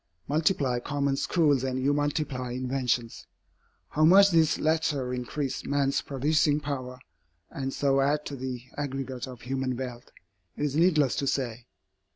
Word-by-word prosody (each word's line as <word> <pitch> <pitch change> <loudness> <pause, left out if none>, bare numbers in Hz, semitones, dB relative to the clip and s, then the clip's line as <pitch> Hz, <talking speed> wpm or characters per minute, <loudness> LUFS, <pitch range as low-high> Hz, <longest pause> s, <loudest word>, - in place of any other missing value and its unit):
Multiply 145 -5 +1
common 140 +1 -1
schools 145 -3 +2
and 130 -1 -1
you 140 +2 +2
multiply 145 -4 -2
inventions. 125 -2 -2 0.6
How 155 - +1
much 195 +5 +7
these 160 -2 +3
latter 150 -5 0
increase 130 +2 -3
man's 140 -1 +1
producing 145 +2 +1
power, 130 -4 -5 0.5
and 135 -1 -3
so 135 0 +2
add 145 +2 +1
to 140 - -5
the 125 -2 -5
aggregate 135 -2 -4
of 125 -2 -10
human 130 0 -2
wealth, 125 -2 -6 0.5
it - - -2
is 145 -1 -2
needless 155 -5 +3
to 140 - -1
say. 120 -3 -2
135 Hz, 145 wpm, -27 LUFS, 130-150 Hz, 0.6 s, much